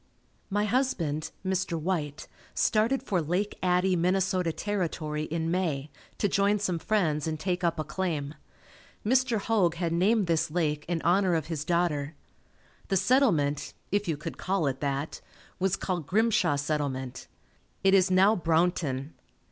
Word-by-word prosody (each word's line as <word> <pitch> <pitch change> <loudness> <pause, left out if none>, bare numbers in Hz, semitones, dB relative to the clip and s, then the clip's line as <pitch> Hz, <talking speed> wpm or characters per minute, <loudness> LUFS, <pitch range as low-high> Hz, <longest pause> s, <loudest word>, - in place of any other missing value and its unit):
My 205 +1 +1
husband, 195 - 0 0.2
Mr. 185 -3 -1
White, 155 -3 -3 0.3
started 230 +5 +2
for 190 -9 0
Lake 180 +7 -2
Addie, 180 +1 +2
Minnesota 185 0 +1
Territory, 160 -6 -2
in 165 +1 -2
May, 155 -6 -1 0.3
to 205 - +1
join 200 +1 +2
some 185 -4 -1
friends 165 -8 0
and 155 -1 -3
take 180 +1 -2
up 170 -1 +1
a 155 - -1
claim. 155 -3 -3 0.7
Mr. 250 0 +3
Hoag 200 -5 +1
had 170 -1 -1
named 200 +5 +3
this 165 -1 +1
lake 150 -2 -1
in 170 -1 -2
honor 180 +1 +3
of 160 -3 -1
his 150 -2 -3
daughter. 160 -3 0 0.7
The 195 - +1
settlement, 175 - +2 0.2
if 205 0 0
you 160 -3 0
could 150 - -7
call 190 -3 0
it 135 -1 -1
that, 140 +1 -2 0.4
was 190 -1 +2
called 175 -6 -3
Grimshaw 215 -7 +2
Settlement. 140 -3 -3 0.6
It 195 0 +5
is 190 -1 +5
now 190 +4 +5
Brownton. 160 -5 0
175 Hz, 150 wpm, -28 LUFS, 155-195 Hz, 0.7 s, It